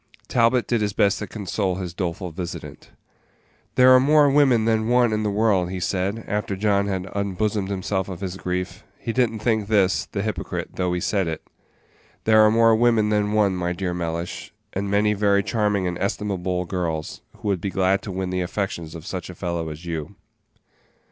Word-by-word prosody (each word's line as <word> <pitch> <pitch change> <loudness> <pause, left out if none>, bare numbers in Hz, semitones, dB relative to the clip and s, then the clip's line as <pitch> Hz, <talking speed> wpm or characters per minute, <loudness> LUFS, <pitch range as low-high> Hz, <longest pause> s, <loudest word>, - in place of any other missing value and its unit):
Talbot 120 +1 +3
did 120 -2 0
his 105 -1 0
best 100 -1 +2
to 105 - -5
console 95 -1 -2
his 90 -2 -5
doleful 90 0 -3
visitant. 85 +1 -7 0.9
"There 130 0 +7
are 130 - +8
more 145 +1 +5
women 135 -6 +4
than 110 -1 +1
one 120 -2 +3
in 105 - 0
the 105 - 0
world," 100 -4 +2
he 95 0 -4
said, 95 +5 -1
after 105 -1 -2
John 100 0 +1
had 95 -2 -2
unbosomed 100 0 -1
himself 95 0 -2
of 90 - -6
his 95 -2 -4
grief 90 0 -4
he 115 - -4
did 125 -1 +3
n't 110 -1 -8
think 110 -4 +1
this, 100 -3 +2
the 100 - -3
hypocrite, 110 -1 -3
though 90 -1 0
he 90 - -1
said 95 0 0
it 80 -1 -4 0.8
"there 110 0 +5
are 110 - +6
more 115 0 +5
women 115 -2 +3
than 105 0 +1
one, 105 -3 +3
my 90 -1 -1
dear 90 0 -3
Mellish, 85 0 -4 0.2
and 100 +1 -2
many 105 +1 +3
very 100 -1 +2
charming 105 -4 0
and 90 -1 -2
estimable 95 -3 -2
girls, 85 -4 -3 0.2
who 105 - -4
would 95 -4 0
be 100 - -2
glad 95 0 +1
to 100 - -6
win 95 0 -3
the 90 0 -1
affections 90 -3 -3
of 80 -1 -9
such 95 -1 -5
a 90 - -8
fellow 85 -2 -3
as 75 +3 -9
you." 80 +2 -5
100 Hz, 195 wpm, -23 LUFS, 90-110 Hz, 0.9 s, are